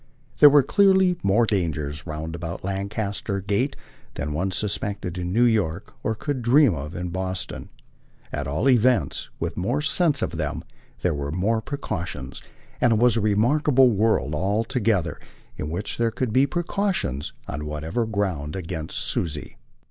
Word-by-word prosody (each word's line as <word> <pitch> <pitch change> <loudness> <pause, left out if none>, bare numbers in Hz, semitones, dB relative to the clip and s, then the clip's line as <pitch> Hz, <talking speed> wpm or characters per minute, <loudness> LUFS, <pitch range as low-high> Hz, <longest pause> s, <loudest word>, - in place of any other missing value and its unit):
There 145 - +10
were 145 -1 +6
clearly 190 +2 +4
more 105 +4 +3
dangers 80 -7 -2
roundabout 80 +2 -5
Lancaster 100 +1 -3
Gate 105 +8 0 0.4
than 75 +1 -3
one 90 +6 -1
suspected 100 -2 -2
in 90 0 -3
New 115 +5 +3
York 100 -6 +1
or 110 - -1
could 140 +2 -3
dream 125 0 +5
of 75 +3 -6
in 90 0 -3
Boston. 95 +1 -3 0.6
At - - -3
all 75 - 0
events, 125 - +2
with 85 0 -3
more 120 +11 0
sense 150 +1 +2
of - - -3
them, - - -3 0.4
there 90 - +2
were 70 0 -3
more 105 +7 0
precautions, 90 - -5 0.4
and 120 - +4
it 110 - +2
was 120 0 +4
a 115 - +1
remarkable 125 +5 +4
world 105 - +1
altogether 100 - 0 0.4
in 75 - -4
which 90 +8 -4
there 115 -1 +3
could 115 0 -3
be 135 +3 +4
precautions, 175 - -1
on 75 +3 -5
whatever 80 +10 -2
ground, 95 -8 -2
against 85 -3 -5
Susie. 75 -3 -2
100 Hz, 150 wpm, -24 LUFS, 85-120 Hz, 0.6 s, There